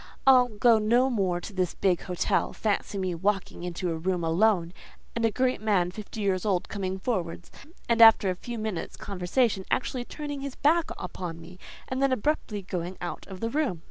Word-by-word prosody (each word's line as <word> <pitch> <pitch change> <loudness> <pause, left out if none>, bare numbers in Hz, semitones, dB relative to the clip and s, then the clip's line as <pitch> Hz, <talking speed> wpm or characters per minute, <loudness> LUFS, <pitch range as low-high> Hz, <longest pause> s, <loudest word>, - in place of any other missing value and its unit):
"I'll 255 -2 +7
go 225 0 +4
no 240 +5 +3
more 190 -6 0
to 205 - -9
his 185 -2 -1
big 185 -3 +1
hotel. 180 -1 0
Fancy 205 -1 -1
me 185 -2 -1
walking 195 +2 -1
into 180 0 -3
a - - -1
room 180 +1 -1
alone, 175 +1 +2 0.4
and 230 - -1
a - - +4
great 255 +1 0
man 195 -5 +2
fifty 215 +2 -7
years 190 -3 0
old 190 -4 0
coming 190 -2 -3
forwards, 180 -6 -3 0.4
and 230 -1 +3
after 225 -4 +8
a - - -3
few 235 +6 -7
minutes' 215 -5 -4
conversation 195 +2 0
actually 250 -1 -1
turning 290 -1 -6
his 275 -1 -5
back 325 +3 +2
upon 175 -2 -6
me, 180 +2 -13 0.3
and 260 +1 -3
then 275 -1 +3
abruptly 250 -5 -1
going 180 0 -4
out 175 - -6
of 190 -2 -9
the 230 - -1
room. 280 - 0
200 Hz, 190 wpm, -27 LUFS, 180-240 Hz, 0.4 s, after